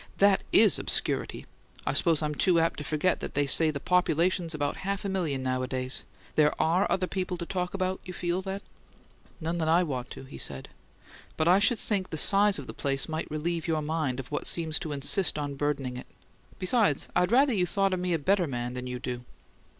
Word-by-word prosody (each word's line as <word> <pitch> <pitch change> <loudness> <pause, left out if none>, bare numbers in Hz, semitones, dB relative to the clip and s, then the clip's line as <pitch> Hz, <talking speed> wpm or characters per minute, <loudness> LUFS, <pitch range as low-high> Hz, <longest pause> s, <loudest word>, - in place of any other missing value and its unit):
"That 200 -1 +4
IS 215 -1 +5
obscurity! - - -1 0.4
I - - 0
suppose 165 -3 +2
I'm 150 0 -1
too 175 +3 +3
apt 165 0 +1
to - - -5
forget 155 +5 0
that - - -6
they 145 0 +2
say 155 +4 +3
the 145 -2 -3
population's 175 0 +1
about 145 -1 -2
half 200 +1 -3
a - - -1
million 160 -9 -1
nowadays. 130 0 -2 0.3
There 150 -1 +2
ARE 175 +5 +2
other 185 - +1
people 185 -1 -3
to 170 - -4
talk 180 +1 -3
about, 185 -1 -1
you 185 - -7
feel, 175 +1 -2
then?" 195 +1 -5 0.8
"None 170 +1 -2
that 160 - 0
I 170 +3 +4
want 130 -6 -4
to," - - -9
he 135 - -10
said. 65 -1 -1 0.7
"But 160 - +1
I 180 +3 +6
should 220 +3 +3
think 200 -3 -2
the 160 - -4
size 200 +5 +4
of 140 - -7
the - - -8
place 135 -1 -1
might 160 0 -4
relieve 165 +2 -2
your 160 -2 0
mind 150 -4 -1
of 135 - -8
what 145 - -2
seems 160 -2 +2
to 155 - -5
insist 145 +5 +2
on 145 -1 -3
burdening 135 -3 -2
it. - - -9 0.5
Besides, 185 - +2
I'd 180 +1 +2
rather 265 +2 +4
you 180 -4 +1
thought 195 +1 +1
me 180 -1 0
a - - +2
better 180 +3 +1
man 120 -2 -4
than 125 0 -5
you 125 0 -4
do." 125 0 -5
165 Hz, 210 wpm, -28 LUFS, 145-185 Hz, 0.8 s, I